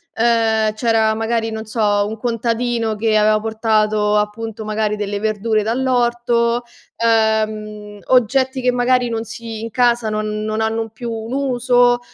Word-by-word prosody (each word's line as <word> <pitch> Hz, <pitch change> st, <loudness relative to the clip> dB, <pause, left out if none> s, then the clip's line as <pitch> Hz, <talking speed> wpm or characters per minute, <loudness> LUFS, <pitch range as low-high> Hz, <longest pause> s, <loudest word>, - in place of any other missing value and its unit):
ehm, 225 Hz, -2 st, +2 dB
c'era, 220 Hz, -1 st, +2 dB
magari, 225 Hz, 0 st, -1 dB
non 220 Hz, 0 st, -5 dB
so, 220 Hz, +2 st, -6 dB, 0.3 s
un 220 Hz, -, -6 dB
contadino 230 Hz, 0 st, -1 dB
che 215 Hz, +1 st, 0 dB
aveva 215 Hz, 0 st, +3 dB
portato, 215 Hz, -1 st, +1 dB
appunto, 215 Hz, +1 st, -3 dB
magari 215 Hz, 0 st, -1 dB
delle 205 Hz, -1 st, -3 dB
verdure 215 Hz, +1 st, 0 dB
dall'orto, 240 Hz, 0 st, +1 dB, 0.3 s
ehm, 215 Hz, -2 st, 0 dB
oggetti 260 Hz, +2 st, +2 dB
che 250 Hz, 0 st, +2 dB
magari 245 Hz, 0 st, +1 dB
non 225 Hz, -1 st, -2 dB
si 225 Hz, 0 st, -7 dB
in 230 Hz, -, -5 dB
casa 240 Hz, -1 st, +1 dB
non 215 Hz, 0 st, -3 dB
non 215 Hz, 0 st, -2 dB
hanno 225 Hz, 0 st, -1 dB
più 230 Hz, +2 st, -7 dB
un 225 Hz, +2 st, -5 dB
uso, 245 Hz, -2 st, +2 dB
225 Hz, 145 wpm, -19 LUFS, 215-240 Hz, 0.3 s, aveva